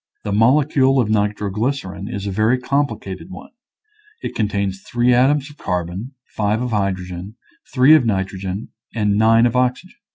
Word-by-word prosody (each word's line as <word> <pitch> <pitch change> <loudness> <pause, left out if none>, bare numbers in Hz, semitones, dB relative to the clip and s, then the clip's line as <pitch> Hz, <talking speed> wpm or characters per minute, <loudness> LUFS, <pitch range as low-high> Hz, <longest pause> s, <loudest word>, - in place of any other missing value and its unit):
The 105 - -3
molecule 135 +4 +3
of 110 -4 +1
nitroglycerin 105 0 -2
is 100 -4 -5
a 100 - -2
very 110 +5 +2
complicated 125 - -3
one; 185 - -11 0.7
it - - -4
contains 100 -3 -2
three 120 +4 +1
atoms 135 +4 +2
of 145 - -18
carbon, 90 - -4
five 105 +1 -1
of 125 0 -3
hydrogen, 95 -1 -3 0.4
three 130 +3 +6
of 155 -4 +6
nitrogen, 95 -1 -3 0.3
and 105 -2 +1
nine 115 +2 +4
of 120 0 0
oxygen. 125 - -1
110 Hz, 150 wpm, -20 LUFS, 100-125 Hz, 0.7 s, three